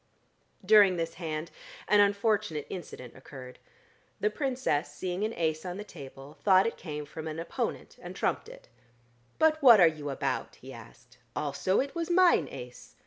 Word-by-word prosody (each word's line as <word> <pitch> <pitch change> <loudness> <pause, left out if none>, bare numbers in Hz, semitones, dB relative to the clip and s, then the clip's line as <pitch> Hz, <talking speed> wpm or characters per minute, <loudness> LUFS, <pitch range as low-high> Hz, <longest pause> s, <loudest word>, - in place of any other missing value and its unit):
During 200 -3 +6
this 165 0 -3
hand 155 0 -4 0.4
an 210 - +4
unfortunate 200 -6 +1
incident 130 -9 -8
occurred. 130 -1 -12 0.6
The 430 - +1
Princess, 255 - -1
seeing 180 +5 -4
an 220 +1 -1
ace 160 -2 -1
on 180 0 -5
the 205 - -6
table, 140 -5 -12
thought 190 -1 +5
it 230 - -2
came 150 -3 -7
from 155 +2 -8
an 155 0 -5
opponent, 165 - -4
and - - -9
trumped 445 - -2
it. - - -14 0.7
"But 315 0 +3
what 240 -6 +8
are 175 - +8
you 155 -3 -1
about?" 135 -3 -3
he 130 +1 -12
asked. 120 +2 -15 0.2
"Also 150 +6 0
it 275 +1 -2
was 335 -1 -3
mine 360 0 +4
ace." 125 -2 -11
170 Hz, 165 wpm, -29 LUFS, 145-215 Hz, 0.7 s, what